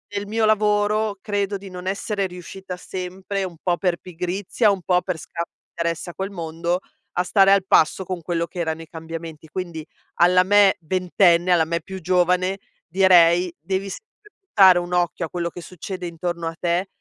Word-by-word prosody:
nel 200 0 -2
mio 220 +1 +1
lavoro 210 0 +2
credo 200 -1 -1
di 195 0 -11
non 180 0 -8
essere 200 +1 -1
riuscita 180 +1 -8
sempre, 190 +2 -5
un 180 -3 -6
po' 175 -2 +1
per 180 -2 0
pigrizia, 185 +5 -1
un 195 -2 -2
po' 180 +1 +2
per 185 -3 -3
scarso 170 +2 -6 0.2
interesse 170 +1 -3
a - - -21
quel 195 +1 -4
mondo, 170 0 -2 0.3
a 180 - +1
stare 195 +1 +4
al 200 -1 +5
passo 175 +4 +3
con 180 -1 -4
quello 170 +1 -1
che - - -14
erano 160 -1 -2
i 165 - -11
cambiamenti. 160 -1 -8
Quindi 170 -3 -5 0.3
alla 180 +1 +5
me 200 0 +5
ventenne, 180 0 +2
alla 170 -2 +4
me 170 +1 -2
più 190 +3 -8
giovane, 180 +2 +2 0.3
direi: 180 -1 +5
"Devi 190 +4 -3
sempre 420 - -12 0.2
buttare 190 - +6
un 175 0 -5
occhio 175 -1 0
a - - -9
quello 170 -1 -3
che 175 - -10
succede 180 +1 -7
intorno 170 0 -4
a 165 - -4
te, 175 +2 0
180 Hz, 185 wpm, -22 LUFS, 170-195 Hz, 0.3 s, buttare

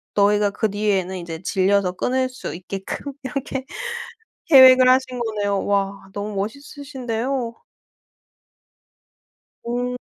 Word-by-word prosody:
너희가 205 0 +3
그 215 +2 -1
뒤에는 195 -3 0
이제 170 -1 -7
질려서 195 0 +2
끊을 255 +7 0
수 255 - -7
있게끔 195 +9 -6
이렇게 265 0 -4 0.8
계획을 260 -3 +8
하신 255 -1 +2
거네요. 205 -3 -1
와 200 -1 -1
너무 205 0 -4
멋있으신데요. 250 +1 -4 2.1
오. 245 +1 -2
220 Hz, 230 characters per minute, -22 LUFS, 200-255 Hz, 2.1 s, 계획을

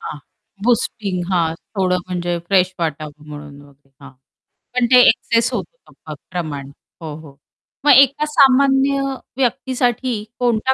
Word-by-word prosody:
हां, 150 - -7 0.5
बूस्टिंग 210 -6 0
हां. 165 -3 +1 0.2
थोडं 185 -1 +1
म्हणजे 175 -1 -2
फ्रेश 185 -1 +2
वाटावं 155 -2 -5
म्हणून 145 -1 -10
वगैरे, 140 -1 -22
हां. 140 -1 -12 0.6
पण 250 -1 +2
ते 250 - +8
एक्सेस 230 +1 +1
होतं - - -7
प - - -6 0.2
प्रमाण. 145 -6 -5 0.3
हो, 155 -2 -6
हो. 150 -3 -14 0.5
मग 295 - +7
एका 275 +2 +4
सामान्य 275 -1 +3 0.4
व्यक्तीसाठी 250 -2 -1 0.2
कोणता 245 +1 +1
195 Hz, 130 wpm, -19 LUFS, 155-255 Hz, 0.6 s, ते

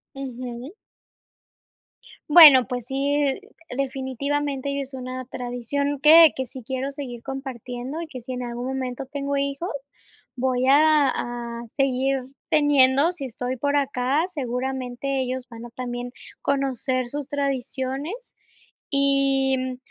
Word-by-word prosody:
Ujú. 255 +1 -7 1.6
Bueno, 295 -6 +10
pues 245 0 -4
sí, 280 +3 0 0.5
definitivamente 275 +1 -2
ya 280 - -2
es 270 0 -7
una 255 0 -6
tradición 255 +4 -3
que 320 +1 +9
que 260 - -2
sí 255 +1 -9
quiero 265 +2 -3
seguir 250 -4 -7
compartiendo 265 +1 -6
y 335 - -6
que 260 -5 -9
si 245 - -8
en 250 0 -4
algún 240 +1 -5
momento 260 0 -4
tengo 280 +1 -3
hijos 280 +5 -2 0.7
voy 255 0 0
a 300 +1 +5
a 240 -1 -4 0.2
seguir 270 0 +1 0.3
teniendo. 290 0 +4
Si 335 -6 -6
estoy 250 +1 -4
por 285 +3 0
acá, 275 +2 +1
seguramente 265 -2 -3
ellos 255 0 -4
van 230 0 -9
a - - -9
también 245 0 -5 0.3
conocer 265 -2 -1
sus 285 +2 -5
tradiciones 280 - -3 0.5
y, 275 -1 +2
mm, 255 0 -4
265 Hz, 125 wpm, -24 LUFS, 250-280 Hz, 1.6 s, Bueno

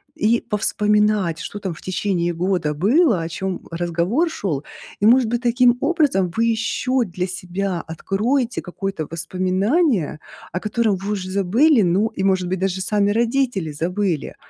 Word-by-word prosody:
и 235 -6 +2
повспоминать, 210 -4 +1
что 205 +4 -6
там 190 -3 -4
в 160 - -13
течение 180 -2 -1
года 175 -3 0
было, 215 - +3
о 165 - -3
чём, 190 +2 -3
м, - - -19
разговор 175 - 0
шёл. 160 - -3 0.4
И, - - +3
может 245 +2 +5
быть, 240 +1 -1
таким 245 0 +3
образом 285 - +2
вы 230 - +2
еще 235 +3 0
для 180 -3 -3
себя 185 0 -3
откроете 225 - -1
какое-то 180 -3 -5
воспоминание, 185 - 0 0.3
о 180 - -1
котором 215 -1 +1
вы 195 +2 -4
уже 185 -2 -4
забыли. 220 - +3
Ну 190 +4 +2
и, 190 - -4
может 190 -2 +1
быть, 185 +1 -2
даже 190 0 -1
сами 205 +1 +1
родители 230 - 0
забыли. 175 +2 -2
195 Hz, 155 wpm, -21 LUFS, 180-230 Hz, 0.4 s, может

